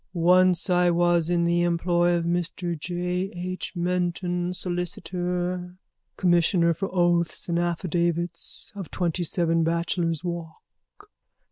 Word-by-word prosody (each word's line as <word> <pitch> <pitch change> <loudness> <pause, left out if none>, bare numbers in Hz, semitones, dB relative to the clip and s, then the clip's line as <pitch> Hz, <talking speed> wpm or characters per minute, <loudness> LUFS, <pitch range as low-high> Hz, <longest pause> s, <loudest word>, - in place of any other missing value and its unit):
_ - - -50
Once 180 +1 +4
I 180 -1 +3
was 175 -1 +2
in 170 -1 +2
the 170 0 +2
employ 175 0 +2
of 170 -1 -1
Mr 175 0 -1
J. 180 +3 -2
H. 185 +2 -5
Menton, 175 0 -1
solicitor, 180 0 -3 0.4
commissioner 175 -1 +3
for 195 +4 -3
oaths 175 -2 +1
and 170 -1 0
affidavits, 170 0 -2
of 195 -4 -7
27 170 -1 0
Bachelor's 170 0 0
Walk. 175 - -9
175 Hz, 115 wpm, -25 LUFS, 170-180 Hz, 0.4 s, Once